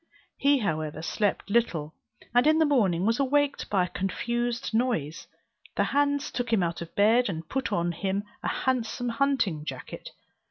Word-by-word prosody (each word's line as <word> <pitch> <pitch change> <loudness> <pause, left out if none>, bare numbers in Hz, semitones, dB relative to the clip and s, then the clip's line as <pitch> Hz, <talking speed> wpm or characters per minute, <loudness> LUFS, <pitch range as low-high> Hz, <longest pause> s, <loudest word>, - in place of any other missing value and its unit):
He 280 +1 +3
however 155 - -2
slept 205 +3 -1
little, 170 -10 +1 0.4
and 245 +4 +4
in 310 +1 +5
the 320 - +4
morning 200 - +2
was 230 +3 +2
awaked 285 +1 +1
by 195 -3 +2
a - - -8
confused 235 +5 -2
noise. 220 - -1 0.5
The - - +2
hands 285 0 +1
took 245 -1 -3
him 210 -5 +3
out 170 0 -2
of 170 - -8
bed, 225 +3 +4
and 160 -3 -5
put 270 +5 -2
on 175 0 +1
him 195 +3 -2 0.2
a - - -3
handsome 245 -1 -1
hunting 230 - 0
jacket. 130 -4 -7
225 Hz, 165 wpm, -27 LUFS, 170-260 Hz, 0.5 s, in